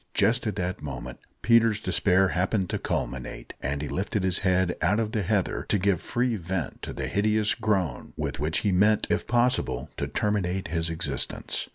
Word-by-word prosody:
Just 120 0 +3
at 105 - -1
that 90 -1 -3
moment 65 -4 -6 0.2
Peter's 115 -2 +4
despair 95 -2 +3
happened 90 +3 0
to - - -1
culminate, 65 -2 -4
and 70 +3 -2
he - - -3
lifted 95 +4 -2
his 95 -1 +1
head 95 -2 +2
out 105 +2 +3
of 110 -2 -1
the 110 - 0
heather 95 0 0
to 105 - +3
give 95 -3 +1
free 120 -1 0
vent 90 -2 -4
to - - -5
the - - -4
hideous 105 +1 +2
groan, 100 - -1
with - - -3
which 75 +2 +1
he 105 - +1
meant, 105 +3 +4
if 105 - 0
possible, 120 - +1
to - - -2
terminate 95 -3 -1
his 85 0 -1
existence. 80 -5 -2
95 Hz, 185 wpm, -27 LUFS, 85-105 Hz, 0.2 s, Peter's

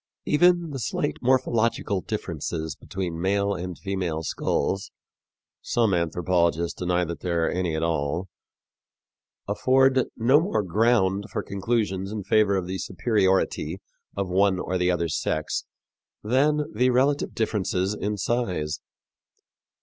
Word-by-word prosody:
Even 175 +1 +3
the 135 - -4
slight 145 +5 -2
morphological 115 -6 +1
differences 80 -6 -4
between 85 -3 -5
male 100 +2 +1
and 90 -1 -5
female 90 -5 -3
skulls 95 +5 -1 0.7
some 115 -4 +1
anthropologists 85 0 0
deny 90 -1 +1
that 85 -2 -5
there 85 -1 0
are - - 0
any 90 -3 -1
at 80 - -1
all 80 +2 -1 1.2
afford 130 +5 +3
no 125 +6 +5
more 170 - 0
ground 100 0 +2
for - - -2
conclusions 100 -2 -1
in 105 -2 -4
favor 105 0 +3
of 95 -2 -1
the 95 +1 -4
superiority 95 -3 0 0.4
of 100 -1 -1
one 95 +1 +3
or 90 +1 -2
the 90 0 +2
other 85 -2 +1
sex 80 0 -2 0.6
than 145 +7 +2
the 125 +4 +3
relative 135 +3 +1
differences 100 -3 0
in 105 0 -3
size. 90 -10 -1
95 Hz, 125 wpm, -25 LUFS, 90-115 Hz, 1.2 s, no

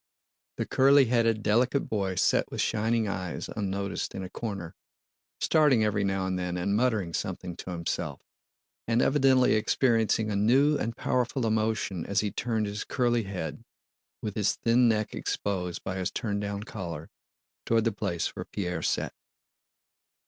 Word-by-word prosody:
The - - -1
curly 135 +1 +5
headed, 115 -2 +2
delicate 120 +6 +2
boy 100 -3 -1
sat - - +2
with - - -5
shining 110 0 +1
eyes 90 -2 -4
unnoticed 100 -1 -3
in 95 - -4
a 90 - -8
corner, 100 -7 -5 0.7
starting 145 -8 +4
every 105 -1 +1
now 95 -1 0
and 95 -1 -1
then 90 0 -2
and 100 +3 0
muttering 110 -7 +1
something 90 +1 -4
to - - -7
himself, 85 -2 -3 0.7
and 115 +1 +2
evidently 135 -1 +4
experiencing 110 -1 +2
a - - -1
new 130 +9 +4
and 115 -3 -3
powerful 125 0 0
emotion 110 -5 0
as 100 0 +1
he 105 -1 -2
turned 110 -3 -1
his 105 +1 -4
curly 120 -4 +1
head, 95 -5 -5 0.6
with 105 - -3
his 105 -2 +1
thin 120 +1 +3
neck 110 -1 0
exposed 90 -3 -3
by 95 - -3
his 95 -1 -1
turn 105 -4 -2
down 100 0 -3
collar, 85 -8 -7 0.6
toward 115 -1 +3
the 115 - +1
place 85 -4 -2
where - - -5
Pierre 90 -4 -3
sat. - - -1
105 Hz, 155 wpm, -28 LUFS, 95-115 Hz, 0.7 s, curly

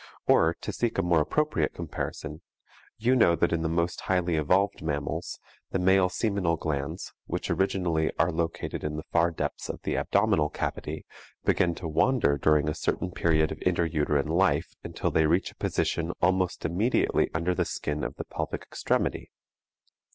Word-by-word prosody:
Or, 80 +1 +4
to - - -4
seek 120 -1 -1
a 95 - +2
more 85 -2 +3
appropriate 150 - 0
comparison: 80 -1 -5 0.6
You 120 +4 +2
know 85 -9 +5
that 85 0 +1
in 85 - 0
the 80 - 0
most 85 +1 -1
highly 90 -2 +1
evolved 95 +7 +2
mammals, 75 -2 -3 0.3
the - - -1
male 95 0 +4
seminal 95 -5 0
glands, 70 -3 -3
which - - -3
originally 90 -5 +1
are 80 +3 +3
located 80 0 -3
in 75 0 -2
the 75 - -5
far 85 0 +3
depths 85 - -4
of - - -4
the - - -1
abdominal 75 -1 +2
cavity, - - -4 0.4
begin 90 -3 +2
to 85 - -5
wander 80 - +2
during 75 +1 +3
a 75 - 0
certain 90 - -2
period 80 -3 +2
of - - -7
intra 85 -2 +1
uterine 75 -2 0
life 90 +3 +2
until - - -2
they 80 -1 +3
reach 85 +4 +1
a - - -23
position 85 0 -1
almost 90 0 +1
immediately 100 +10 +1
under 85 +3 +1
the - - +1
skin 75 0 -3
of - - -3
the - - -6
pelvic - - -4
extremity. - - -1
85 Hz, 170 wpm, -27 LUFS, 80-90 Hz, 0.6 s, know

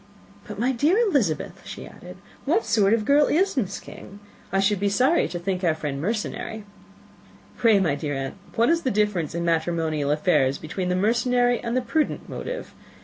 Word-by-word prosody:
"But, 210 - -7
my 245 +5 +1
dear 295 - +2
Elizabeth," 280 - 0
she - - -8
added, - - -12 0.3
"what 445 - +2
sort 210 -1 +3
of 215 -2 -3
girl 285 +3 +4
is 380 +4 +2
Miss 200 -7 -2
King? 200 +2 -12 0.3
I 195 - +1
should 195 0 +2
be 200 +1 +1
sorry 260 +11 +3
to 175 - -5
think 185 +1 -3
our 165 -3 +2
friend 145 -3 -4
mercenary." 215 +2 -3 0.9
"Pray, 225 -4 +4
my 175 -7 +1
dear 145 0 -3
aunt, 135 0 -4 0.2
what 230 +1 +3
is 335 0 +2
the 260 - 0
difference 200 - 0
in 170 0 -2
matrimonial 160 -3 0
affairs, 150 -4 +2
between 180 +3 -4
the 180 - +1
mercenary 245 +4 +2
and 235 +1 -2
the - - +2
prudent 295 +6 -1
motive? - - -6
205 Hz, 185 wpm, -24 LUFS, 170-245 Hz, 0.9 s, girl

